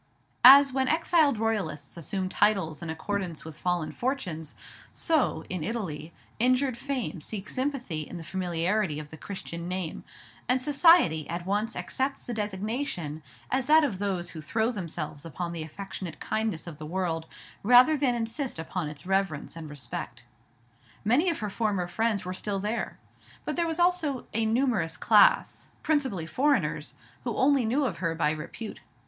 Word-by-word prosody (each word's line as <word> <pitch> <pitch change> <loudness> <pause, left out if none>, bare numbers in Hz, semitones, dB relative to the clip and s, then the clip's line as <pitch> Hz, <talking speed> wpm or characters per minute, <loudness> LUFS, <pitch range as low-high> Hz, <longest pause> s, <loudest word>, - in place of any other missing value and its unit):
As 275 +1 +10
when 265 0 +1
exiled 320 -4 +3
royalists 210 -9 -2
assume 185 +3 -3
titles 190 -5 +1
in 170 - -5
accordance 170 0 -3
with 160 -1 -8
fallen 175 -1 -1
fortunes, 180 - -3 0.4
so, 295 - +1
in 180 -4 -3
Italy, 170 -7 -4 0.3
injured 255 +2 +3
fame 255 - -3
seeks 200 +3 -6
sympathy 255 - -2
in 165 +4 -7
the 165 - -7
familiarity 175 0 0
of 150 -1 -7
the - - -8
Christian 170 -2 -6
name, 180 -2 -3 0.5
and 255 +1 +4
"Society" 285 - +4
at 170 +1 -4
once 210 +4 -1
accepts 270 +1 -2
the 240 - -4
designation 205 - -3 0.3
as 265 -1 +1
that 310 +1 +7
of 210 -11 -1
those 190 -4 -2
who 160 - -7
throw 220 - 0
themselves 165 - -5
upon 170 +1 -4
the 165 - -4
affectionate 170 0 -7
kindness 220 -7 -2
of 170 -4 -8
the 155 -1 -7
world, 165 -2 -2 0.3
rather 250 +7 +7
than 270 -4 +1
insist 235 - -2
upon 160 0 -3
its 150 0 -10
reverence 190 -7 -1
and 160 -2 -7
respect. 145 -3 -6 0.8
Many 270 - +4
of 330 - -1
her - - -2
former 205 -4 0
friends 215 +2 0
were 180 - -3
still 200 +2 -2
there; 210 +4 -3 0.5
but - - -2
there 340 -1 +1
was 325 - -2
also 345 -7 +1
a 225 0 +1
numerous 225 -8 +1
class, - - +4
principally 265 - 0
foreigners, 185 - 0 0.3
who 235 -3 -3
only 270 -2 +4
knew 270 +6 +1
of 190 -10 -2
her 165 -1 -1
by 150 -2 +2
repute. 170 +8 -6
200 Hz, 160 wpm, -28 LUFS, 165-255 Hz, 0.8 s, As